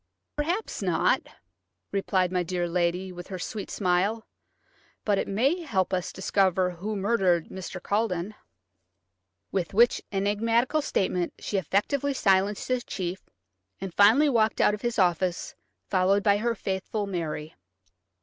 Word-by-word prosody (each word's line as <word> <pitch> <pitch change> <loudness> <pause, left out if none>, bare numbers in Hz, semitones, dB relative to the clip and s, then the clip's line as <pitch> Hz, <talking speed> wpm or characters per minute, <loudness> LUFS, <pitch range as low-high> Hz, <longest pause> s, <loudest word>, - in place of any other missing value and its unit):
"Perhaps 340 - -2
not," 180 -4 +2 0.7
replied 190 -2 +1
my 180 -1 +1
dear 175 0 -2
lady, 180 +2 0
with 175 0 -9
her 190 - -5
sweet 200 +3 -5
smile; 200 +4 0 0.8
"but 205 -2 +2
it - - -2
may 270 - +1
help 195 - -1
us 180 -1 0
to - - -9
discover 190 -1 +2
who 195 +5 -5
murdered 190 -5 +1
Mr. 190 0 -7
Culledon." 200 -1 -1 1.2
With 190 -1 -2
which 235 +2 +5
enigmatical 225 +8 +1
statement 180 -8 -1
she 205 - -3
effectually 270 - 0
silenced 195 -2 +2
the 255 -1 0
chief, 185 -5 -5 0.5
and 190 -2 -6
finally 225 - +6
walked 225 -5 +2
out - - +4
of 210 - -5
his 240 -1 -2
office, 180 -2 +1 0.3
followed 195 +1 +2
by 205 -1 +4
her 230 +2 0
faithful 195 +2 -3
Mary. 160 -5 -4
195 Hz, 140 wpm, -27 LUFS, 180-220 Hz, 1.2 s, finally